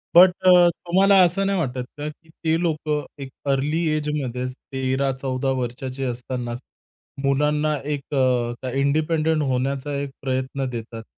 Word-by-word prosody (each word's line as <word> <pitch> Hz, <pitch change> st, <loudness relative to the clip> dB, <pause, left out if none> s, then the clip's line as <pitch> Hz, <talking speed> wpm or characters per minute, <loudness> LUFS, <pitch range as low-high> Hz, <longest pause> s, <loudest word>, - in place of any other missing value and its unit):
But 180 Hz, +2 st, +9 dB, 0.2 s
अ, -, -, +9 dB, 0.3 s
तुम्हाला 195 Hz, +3 st, +5 dB
असं 180 Hz, +3 st, +2 dB
नाही 195 Hz, -2 st, +1 dB
वाटत 125 Hz, -4 st, -2 dB
का, 145 Hz, -, -4 dB
की 160 Hz, +2 st, -16 dB
ते 160 Hz, 0 st, -1 dB
लोक 155 Hz, -3 st, -1 dB, 0.3 s
एक 135 Hz, -, -6 dB, 0.2 s
अर्ली 145 Hz, +4 st, 0 dB, 0.2 s
एजमध्येच 130 Hz, -4 st, -2 dB, 0.2 s
13-14 130 Hz, 0 st, -1 dB
वर्षाची 130 Hz, +2 st, -4 dB
असतानाच, 125 Hz, -1 st, -4 dB, 0.7 s
मुलांना 150 Hz, +2 st, +2 dB, 0.2 s
एक 145 Hz, +1 st, -7 dB
अ, 125 Hz, -1 st, +1 dB
इंडिपेंडंट 155 Hz, +3 st, +1 dB
होण्याचा 135 Hz, +2 st, -1 dB
एक 140 Hz, -1 st, -3 dB
प्रयत्न 130 Hz, 0 st, -2 dB
देतात. 115 Hz, -1 st, -6 dB
135 Hz, 130 wpm, -23 LUFS, 130-155 Hz, 0.7 s, But